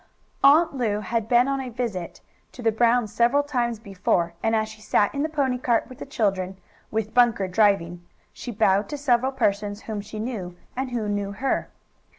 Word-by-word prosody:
Aunt 305 Hz, +4 st, +6 dB
Lu 220 Hz, -6 st, -1 dB
had 225 Hz, +2 st, -2 dB
been 245 Hz, +2 st, +4 dB
on 275 Hz, -1 st, -1 dB
a 260 Hz, -, -5 dB
visit 225 Hz, -8 st, -4 dB, 0.3 s
to 250 Hz, -, -9 dB
the 225 Hz, -, +3 dB
Brown's 230 Hz, -1 st, +2 dB
several 240 Hz, +6 st, +3 dB
times 240 Hz, -5 st, -1 dB
before, 180 Hz, -5 st, -1 dB
and 225 Hz, 0 st, +1 dB
as 215 Hz, 0 st, +1 dB
she 220 Hz, 0 st, -12 dB
sat 205 Hz, -1 st, +2 dB
in 280 Hz, -, -2 dB
the 310 Hz, -, 0 dB
pony 270 Hz, -5 st, 0 dB
cart 240 Hz, -2 st, +1 dB
with 255 Hz, -, -12 dB
the -, -, -7 dB
children, 195 Hz, -8 st, -1 dB, 0.3 s
with 220 Hz, 0 st, -2 dB
Bunker 235 Hz, -6 st, +3 dB
driving, 180 Hz, -3 st, +2 dB, 0.3 s
she -, -, -8 dB
bowed 200 Hz, -2 st, +2 dB
to 295 Hz, -, -4 dB
several 260 Hz, -2 st, +2 dB
persons 205 Hz, -4 st, -1 dB
whom 215 Hz, -2 st, -4 dB
she 210 Hz, +1 st, -9 dB
knew 210 Hz, -6 st, -5 dB, 0.2 s
and 260 Hz, +1 st, -2 dB
who 235 Hz, -4 st, -2 dB
knew 205 Hz, -1 st, -2 dB
her. 265 Hz, +7 st, -1 dB
225 Hz, 190 wpm, -24 LUFS, 205-250 Hz, 0.3 s, Aunt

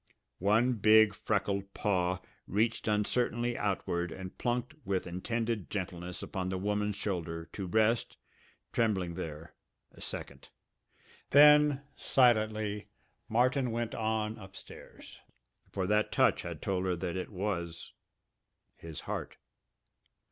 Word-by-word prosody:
One 110 Hz, +6 st, +3 dB
big 110 Hz, -1 st, +6 dB
freckled 100 Hz, -1 st, -1 dB
paw 90 Hz, -2 st, 0 dB, 0.3 s
reached 110 Hz, +5 st, 0 dB
uncertainly 120 Hz, +3 st, +1 dB
outward 90 Hz, -4 st, -1 dB
and 95 Hz, +2 st, -7 dB
plunked 125 Hz, +4 st, -1 dB
with 95 Hz, -2 st, -1 dB
intended 110 Hz, +3 st, -2 dB
gentleness 90 Hz, -2 st, -4 dB
upon 95 Hz, -2 st, -3 dB
the 95 Hz, -, -2 dB
woman's 105 Hz, +1 st, -1 dB
shoulder, 85 Hz, -5 st, -3 dB
to 95 Hz, -2 st, -4 dB
rest, 110 Hz, +5 st, +2 dB, 0.6 s
trembling 95 Hz, -7 st, +1 dB
there, 80 Hz, -2 st, -7 dB, 0.4 s
a -, -, -16 dB
second. -, -, -6 dB, 0.8 s
Then 150 Hz, 0 st, +7 dB
silently 110 Hz, -4 st, +2 dB, 0.4 s
Martin 125 Hz, +3 st, +2 dB
went 115 Hz, 0 st, -2 dB
on 110 Hz, 0 st, -1 dB
upstairs. 95 Hz, -1 st, -12 dB, 0.5 s
For 95 Hz, -2 st, -2 dB
that 105 Hz, +2 st, +2 dB
touch -, -, +3 dB
had -, -, -7 dB
told 95 Hz, -1 st, 0 dB
her 90 Hz, -1 st, +1 dB
that 85 Hz, +1 st, -3 dB
it 95 Hz, -, -3 dB
was 90 Hz, -4 st, -4 dB, 0.8 s
his 80 Hz, -3 st, -8 dB
heart! -, -, -5 dB
105 Hz, 115 wpm, -31 LUFS, 90-115 Hz, 0.8 s, Then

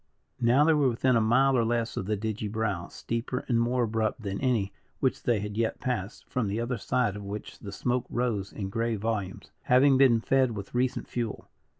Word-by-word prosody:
Now 120 Hz, +5 st, +4 dB
they 160 Hz, +1 st, +5 dB
were 145 Hz, -3 st, +3 dB
within 125 Hz, +2 st, +2 dB
a 115 Hz, -, +4 dB
mile 130 Hz, +5 st, +4 dB
or 120 Hz, -, +3 dB
less 115 Hz, 0 st, -1 dB
of 95 Hz, -, -3 dB
the 105 Hz, -1 st, 0 dB
digy 110 Hz, 0 st, -3 dB
brow, 105 Hz, -6 st, -2 dB
steeper 115 Hz, +2 st, -4 dB
and 115 Hz, -2 st, +2 dB
more 120 Hz, +1 st, +1 dB
abrupt 110 Hz, +1 st, -1 dB
than 100 Hz, -1 st, -3 dB
any 115 Hz, -7 st, +1 dB, 0.3 s
which 130 Hz, -, 0 dB
they 115 Hz, -4 st, +1 dB
had 105 Hz, 0 st, -5 dB
yet 115 Hz, -1 st, 0 dB
passed, 120 Hz, -5 st, -4 dB
from 125 Hz, -4 st, -1 dB
the 100 Hz, +3 st, -2 dB
other 120 Hz, 0 st, -2 dB
side 115 Hz, -2 st, 0 dB
of 105 Hz, -, -6 dB
which 100 Hz, +2 st, -7 dB
the 100 Hz, -, -8 dB
smoke 125 Hz, +5 st, -1 dB
rose 115 Hz, -6 st, -1 dB
in 95 Hz, -2 st, -5 dB
grey 115 Hz, +2 st, -1 dB
volumes, 105 Hz, -3 st, -3 dB
having 130 Hz, +1 st, +5 dB
been 125 Hz, -4 st, +6 dB
fed 130 Hz, +1 st, +2 dB
with 100 Hz, -1 st, -7 dB
recent 125 Hz, +1 st, 0 dB
fuel. 115 Hz, -3 st, -4 dB
115 Hz, 210 wpm, -28 LUFS, 105-125 Hz, 0.3 s, been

